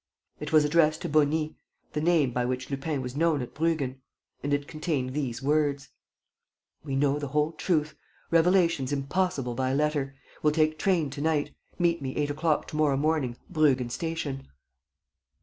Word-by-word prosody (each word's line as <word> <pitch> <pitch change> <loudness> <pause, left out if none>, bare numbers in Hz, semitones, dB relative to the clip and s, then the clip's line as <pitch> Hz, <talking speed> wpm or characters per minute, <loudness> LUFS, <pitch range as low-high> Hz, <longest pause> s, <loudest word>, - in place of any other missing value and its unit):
It 150 +1 -5
was 155 -1 +5
addressed 155 0 +3
to - - -2
"Beauny," 155 +1 +2 0.4
the 150 - -1
name 160 -5 +3
by 125 0 0
which 125 +2 -3
Lupin 140 0 -2
was 125 +1 -6
known 160 -1 +2
at 125 - -9
Bruggen. 145 -5 -1 0.4
And 145 - -3
it 145 0 0
contained 150 -5 -2
these 135 -4 -3
words: 145 -1 +1 0.9
"We 140 -3 -3
know 140 +1 +2
the 145 - -3
whole 150 +3 +1
truth. 155 -3 0 0.4
Revelations 165 -5 +3
impossible 140 -2 -1
by 130 +2 0
letter. 145 -2 0 0.3
Will 150 - +3
take 155 0 +2
train 170 -7 +1
to 140 0 -6
night. 155 -2 0 0.2
Meet 170 -2 +1
me 130 -1 -4
eight 145 -1 0
o'clock 155 +1 0
to - - -7
morrow 150 -3 +2
morning 145 -5 0
Bruggen 135 -7 +2
station." 160 -3 -4
150 Hz, 165 wpm, -27 LUFS, 135-160 Hz, 0.9 s, was